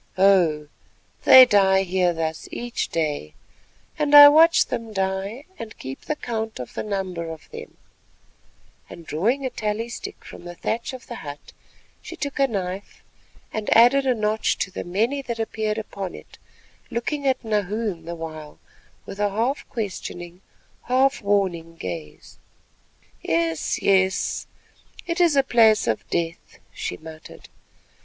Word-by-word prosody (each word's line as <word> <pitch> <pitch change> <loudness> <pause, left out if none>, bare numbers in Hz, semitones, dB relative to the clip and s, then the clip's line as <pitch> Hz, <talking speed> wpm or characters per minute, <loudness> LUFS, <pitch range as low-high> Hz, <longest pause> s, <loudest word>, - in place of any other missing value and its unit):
Oh! 175 -6 +3 0.6
they 260 0 +10
die 195 -4 +4
here 180 -1 +1
thus 160 -1 -4
each 240 0 -3
day, 150 - -3 0.6
and 295 -1 +3
I 290 0 +12
watch 320 +2 +6
them 225 -1 -5
die 195 +6 -3
and 225 -1 -8
keep 130 +1 -8
the 305 - -1
count 225 - -4
of 125 - -7
the - - -3
number 185 -5 -4
of 160 -1 -9
them," - - -10 1.1
and 170 - -11
drawing 230 - 0
a 260 - -2
tally 220 0 -3
stick - - -8
from - - -11
the 175 0 -9
thatch 230 +8 -3
of 255 - -9
the 240 - -8
hut, 145 -1 -10 0.5
she 340 - -9
took 285 -4 -5
a 275 - +4
knife 195 -3 -5 0.5
and 215 -1 -3
added 265 +4 +5
a 255 - +3
notch 215 0 0
to 190 - -9
the - - -5
many 225 +10 -1
that 235 -3 -5
appeared 220 -1 -2
upon 200 -4 -6
it, - - -14 0.5
looking 280 +4 -2
at 260 -1 +1
Nahoon 210 -4 -2
the 170 +1 -5
while 155 -2 -8 0.5
with 195 - -9
a 205 0 +2
half 230 +8 -2
questioning, 180 -5 -6 0.4
half 265 +2 +2
warning 185 -5 0
gaze. 85 - -8 0.8
"Yes, 165 -1 -1
yes, 190 -1 +1 0.6
it 345 +1 -1
is 335 -4 +4
a 275 - +4
place 225 -4 +4
of 110 - -2
death," 170 -1 -4 0.2
she 90 - -5
muttered. 160 0 -12
205 Hz, 150 wpm, -23 LUFS, 170-240 Hz, 1.1 s, I